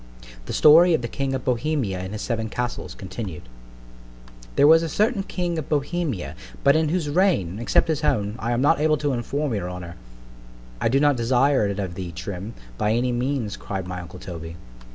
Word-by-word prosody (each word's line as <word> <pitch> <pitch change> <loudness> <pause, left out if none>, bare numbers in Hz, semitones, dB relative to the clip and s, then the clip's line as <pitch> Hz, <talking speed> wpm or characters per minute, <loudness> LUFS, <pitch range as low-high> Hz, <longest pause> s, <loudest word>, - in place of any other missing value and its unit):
THE - - -4
STORY 165 +3 +7
OF 125 - -3
THE - - -1
KING 135 +2 -2
OF 130 - -5
BOHEMIA 125 -6 0
AND 95 +2 -6
HIS 105 - -4
SEVEN 115 -2 -2
CASTLES, 125 +1 -4
CONTINUED 95 -3 -7 1.1
THERE 140 - +5
was 160 +2 +7
a 165 - -2
certain 215 +4 +1
king 175 -3 -2
of 150 - -7
Bohemia, 150 - -1 0.3
but 140 - +5
in 160 -1 +2
whose 170 -2 0
reign, 145 - +1
except 120 - +2
his 160 -1 -1
own, 105 -7 +1
I 120 0 -2
am 120 +1 +1
not 165 +2 +4
able 155 0 +3
to 145 -1 -1
inform 140 +3 -2
your 95 -4 -2
honour—— 90 -1 -8 0.8
I - - +2
do 135 +4 +3
not 145 -2 +3
desire 125 0 +3
it 100 -1 -3
of 95 -4 -3
thee, 90 -1 -6
Trim, 90 +5 -6 0.2
by 105 +1 +2
any 125 +2 +1
means, 120 -3 -1
cried 95 -2 -5
my 90 0 -5
uncle 85 +1 -10
_Toby. 85 -3 -8
125 Hz, 195 wpm, -24 LUFS, 100-150 Hz, 1.1 s, STORY